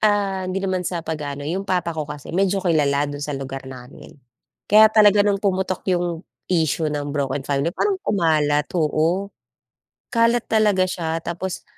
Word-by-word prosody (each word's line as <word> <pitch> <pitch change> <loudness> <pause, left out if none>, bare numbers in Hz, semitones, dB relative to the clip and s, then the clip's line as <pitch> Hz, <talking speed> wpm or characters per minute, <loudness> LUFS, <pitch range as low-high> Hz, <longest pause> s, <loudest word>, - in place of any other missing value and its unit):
ah, 200 -3 +1
hindi 185 +1 -2
naman 185 -1 0
sa 170 -2 -4
pag-aano, 145 -3 -5
'yong 190 +6 -3
papa 180 -2 0
ko 155 -2 -5
kasi 150 -1 -8
medyo 195 +2 +1
kilala 145 -4 +2
do'n 145 0 -6
sa 145 -1 -3
lugar 135 0 -6
namin. 125 +1 -12 0.5
Kaya 215 +1 +7
talaga 210 -2 +5
no'ng 200 -1 +2
pumutok 190 -2 -1
'yong 175 -1 -2 0.2
issue 160 -3 +1
ng 145 -1 -3
broken 140 -1 -2
family 140 +3 0
parang 395 -2 0
kumalat. 155 - +1
Oo. 165 +4 0 0.8
Kalat 230 0 +3
talaga 210 -4 +3
siya 165 -2 -3
tapos 175 +2 -4
170 Hz, 160 wpm, -22 LUFS, 150-195 Hz, 0.8 s, Kaya